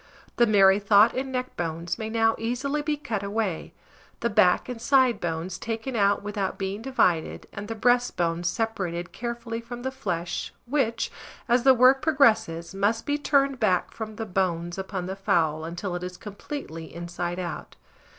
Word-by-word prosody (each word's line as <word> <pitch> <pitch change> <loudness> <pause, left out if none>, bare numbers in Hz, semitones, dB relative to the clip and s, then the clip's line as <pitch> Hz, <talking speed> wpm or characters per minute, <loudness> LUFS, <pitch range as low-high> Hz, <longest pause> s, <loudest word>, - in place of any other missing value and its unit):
The 240 - +5
merrythought 205 +1 +5
and 265 +1 -3
neck 255 0 -3
bones 170 0 -3
may 220 0 -3
now 225 0 +3
easily 260 +6 -1
be 295 0 -1
cut 225 -8 -3
away, 200 -3 -2 0.5
the 235 - 0
back 180 -3 +4
and 245 -3 -6
side 255 -3 +4
bones 170 +2 -3
taken 230 +3 -4
out 200 -2 +2
without 205 -2 -3
being 195 +2 -3
divided, 185 -10 +1
and 205 +1 -6
the 225 - -4
breastbone 210 -8 +1
separated 175 -3 -2
carefully 235 -1 -5
from 240 +1 -8
the 265 - -2
flesh 175 -9 -3
(which, 240 -3 0 0.4
as 245 0 +4
the 265 +1 +6
work 255 +2 +6
progresses, 220 - +2
must 205 +4 0
be 290 0 0
turned 275 -2 +2
back 185 -5 +1
from 220 -1 -6
the 225 - -4
bones 180 -2 -1
upon 190 -1 -4
the 190 +1 -4
fowl, 165 -6 +1
until 175 +3 -4
it 175 - -4
is 180 0 -6
completely 200 - -7
inside 175 +1 -4
out). 175 -3 -5
210 Hz, 165 wpm, -26 LUFS, 180-240 Hz, 0.5 s, the